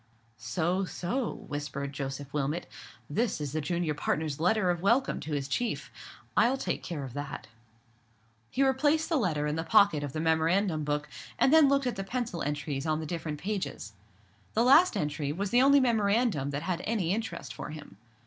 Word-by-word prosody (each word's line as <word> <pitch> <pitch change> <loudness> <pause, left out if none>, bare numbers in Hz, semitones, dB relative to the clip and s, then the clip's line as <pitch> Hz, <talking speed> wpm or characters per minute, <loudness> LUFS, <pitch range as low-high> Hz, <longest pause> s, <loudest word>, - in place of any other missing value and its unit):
"So, 160 - 0
so," 215 +7 -2 0.2
whispered 140 -1 -4
Joseph 135 0 -5
Wilmot, 150 +4 -1 0.4
"this 220 +8 -1
is 145 -3 -3
the 155 - -1
junior 170 +1 -1
partner's 150 0 -2
letter 185 +2 +3
of 175 -1 -3
welcome 235 +8 +2
to 155 - -5
his 140 -2 -1
chief. 235 - -2 0.4
I'll 250 +3 +4
take - - -2
care 160 -6 -5
of 130 -3 -7
that." 145 0 -5 1.0
He 275 - +1
replaced 290 +4 +2
the 330 - +2
letter 160 - 0
in 150 +1 -1
the 160 - -1
pocket 200 -3 +4
of 145 -2 -5
the 155 - -3
memorandum 160 +1 +2
book, 150 0 -1 0.3
and 270 - +4
then 315 -3 +7
looked 275 -1 +2
at 245 - -2
the 195 - -2
pencil 230 -4 -3
entries 145 0 -3
on 155 0 +1
the 160 - -4
different 155 -2 -4
pages. 180 - -4 0.6
The 225 - +4
last 305 +9 +6
entry 150 -1 -2
was 195 +5 -3
the 245 - +5
only 280 +1 +6
memorandum 220 - +2
that 145 +2 -3
had 180 -1 -2
any 195 -6 0
interest 225 +2 -4
for - - -7
him. 150 -10 -10
165 Hz, 185 wpm, -29 LUFS, 145-225 Hz, 1.0 s, then